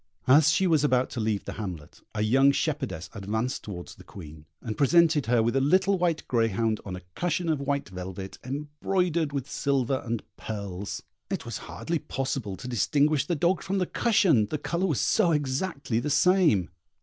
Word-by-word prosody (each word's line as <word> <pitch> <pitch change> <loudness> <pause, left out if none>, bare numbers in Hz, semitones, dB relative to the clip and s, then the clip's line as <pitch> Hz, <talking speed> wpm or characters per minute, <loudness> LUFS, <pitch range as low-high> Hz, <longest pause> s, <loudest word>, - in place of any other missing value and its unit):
As 145 +4 +6
she 190 - +3
was 160 -5 +3
about 130 -3 +2
to 120 - -4
leave 110 -2 -1
the - - -5
hamlet, 85 -7 -7
a 105 - 0
young 135 +6 +5
shepherdess 135 - -2
advanced 110 +5 -2
towards 90 -4 -7
the - - -15
Queen, 80 -4 -12
and 110 -2 -5
presented 155 -1 +4
her 120 -1 +3
with 115 +3 0
a 135 - +3
little 185 +7 +3
white 170 -3 0
greyhound 115 -2 +1
on 95 -3 -6
a 90 - -9
cushion 175 0 -1
of 155 -3 +1
white 140 0 -1
velvet, 95 +1 -7
embroidered 150 +4 -1
with 140 -2 -3
silver 135 -2 0
and 115 -2 -3
pearls: 100 -2 -5 0.3
it - - -3
was - - -5
hardly 170 -1 -2
possible 130 -8 -3
to 125 - -8
distinguish 140 +5 +2
the 175 - 0
dog 170 +4 +1
from 195 +1 -2
the 185 - +1
cushion, 180 - +3
the 155 - -2
colour 170 +5 -1
was 150 -8 0
so 170 - +3
exactly 140 -3 -1
the 150 - -2
same. 150 - +3
135 Hz, 185 wpm, -27 LUFS, 110-160 Hz, 0.3 s, As